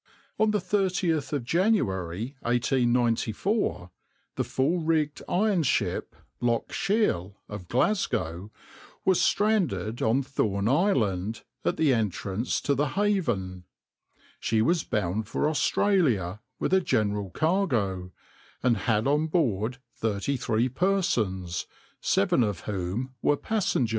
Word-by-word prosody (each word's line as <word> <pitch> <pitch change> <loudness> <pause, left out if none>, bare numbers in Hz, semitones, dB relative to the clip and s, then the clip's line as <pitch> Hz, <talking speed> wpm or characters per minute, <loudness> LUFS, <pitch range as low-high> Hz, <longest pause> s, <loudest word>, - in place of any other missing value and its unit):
On 220 - +4
the 210 - +2
30th 185 -6 0
of 145 -4 -1
January 115 - 0
1894, 120 - 0 0.4
the - - 0
full 150 +7 0
rigged 155 -2 0
iron 200 -1 +2
ship 145 - -1 0.3
{\itshape{Loch 120 -1 0
Shiel}} 150 - 0
of 100 -4 -8
Glasgow 105 - 0 0.6
was 190 -2 +4
stranded 200 - +1
on 120 +5 +2
Thorn 105 -6 -1
Island, 115 - +1 0.2
at - - 0
the 150 -4 +3
entrance 105 0 -1
to 140 - +1
the 140 +1 0
Haven. 120 - 0 0.7
She 110 -1 +1
was 170 +6 +2
bound 105 +1 -1
for 150 - 0
Australia 140 - +1 0.2
with - - -1
a 190 - +5
general 105 - 0
cargo, 115 - 0 0.5
and 120 -3 +3
had 105 +3 +1
on 150 +3 +2
board 125 - 0 0.2
thirty 110 +5 -1
three 115 -1 +1
persons, 120 - 0 0.3
seven - - +2
of 105 -6 -1
whom 105 +6 -3
were 145 - +3
passengers. 195 - 0
125 Hz, 120 wpm, -27 LUFS, 105-170 Hz, 0.7 s, a